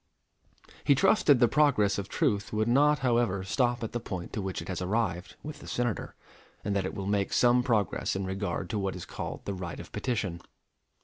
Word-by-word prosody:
He 140 - +5
trusted 140 - +4
the 120 - +6
progress 115 -9 +3
of 100 0 -5
truth 100 -1 0
would 110 +1 0
not, 145 +5 +4
however, 115 -6 +2
stop 120 +4 0
at 110 - -3
the 120 - -2
point 95 -6 -6
to 105 - -2
which 95 -1 -3
it 85 - -7
has 95 -1 -3
arrived 95 -2 -1
with 150 0 -7
the - - -11
Senator, 120 -4 -2 0.5
and 100 0 -1
that 95 -2 0
it - - -4
will 95 - -4
make 100 -1 0
some 125 0 +4
progress 110 -9 0
in 95 0 -2
regard 95 -1 -3
to 105 - -1
what 95 -1 -2
is 90 - -7
called - - -6
the 100 - -2
right 90 -3 -6
of - - -10
petition. 100 -9 -2
105 Hz, 205 wpm, -29 LUFS, 95-120 Hz, 0.5 s, the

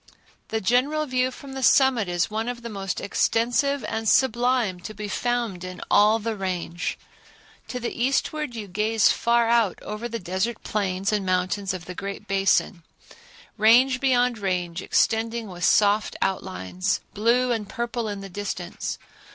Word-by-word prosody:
The 220 - -1
general 260 +9 +1
view 255 -2 +1
from 270 +1 -10
the 265 - -5
summit 260 -5 +4
is 175 +3 0
one 220 +2 -2
of 240 -1 -6
the 235 - -5
most 195 -2 -3
extensive 240 +6 +1
and 220 -1 -1
sublime 245 -6 +2
to 215 +4 -8
be 210 +1 -5
found 235 -4 -2
in 185 0 -7
all 210 +2 +5
the 225 0 -3
Range. 180 -3 -3 0.7
To 250 - -4
the 240 - -3
eastward 275 +1 0
you 215 -3 -6
gaze 215 +3 +2
far 235 0 +2
out 230 -5 +2
over 215 +3 -5
the 230 - -3
desert 190 +4 -3
plains 195 -1 -1
and 205 -2 +1
mountains 185 +1 0
of 185 -2 -6
the 180 - -7
"Great 200 +2 -6
Basin," 195 -2 +1 0.8
range 250 +4 +5
beyond 250 -3 +2
range 180 -3 -2
extending 225 +2 +1
with 175 -1 -3
soft 210 0 +3
outlines, 185 - -2
blue 240 +4 +2
and 215 -3 -2
purple 235 -1 -3
in 205 -1 -4
the 195 - -7
distance. 205 +2 -5
220 Hz, 160 wpm, -24 LUFS, 195-240 Hz, 0.8 s, all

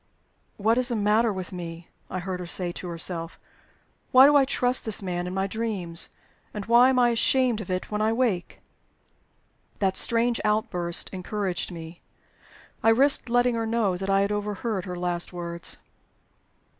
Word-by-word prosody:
"What 225 +4 +2
is 250 - 0
the 240 - -1
matter 215 +2 +2
with 190 -1 -5
me?" 170 -1 -7 0.2
I - - -4
heard 185 0 -4
her 180 - -6
say 175 0 -3
to 180 - -7
herself. 165 0 -2 0.7
"Why 260 +1 +9
do 290 +1 +5
I 280 -2 +6
trust 255 -1 0
this 215 -2 +2
man 175 -1 -3
in 180 - -5
my 190 0 0
dreams? 195 -5 -3 0.5
And 205 -2 -4
why 240 +3 +6
am 260 - +1
I 245 -1 +5
ashamed 240 0 +2
of 190 - -9
it 185 +2 -3
when 210 0 -1
I 215 +1 +2
wake?" 225 -7 -1 1.2
That 190 -2 0
strange 235 +2 +1
outburst 180 -5 0
encouraged 190 -1 -3
me. 165 0 -9 0.8
I 225 - +4
risked 260 +2 +3
letting 245 +1 +3
her 225 -1 -2
know 220 -5 +1
that 190 +2 -4
I 195 0 +3
had 200 +1 0
overheard 210 -1 -3
her 180 -2 -5
last 175 0 -2
words. 170 -1 -5
205 Hz, 170 wpm, -25 LUFS, 180-230 Hz, 1.2 s, Why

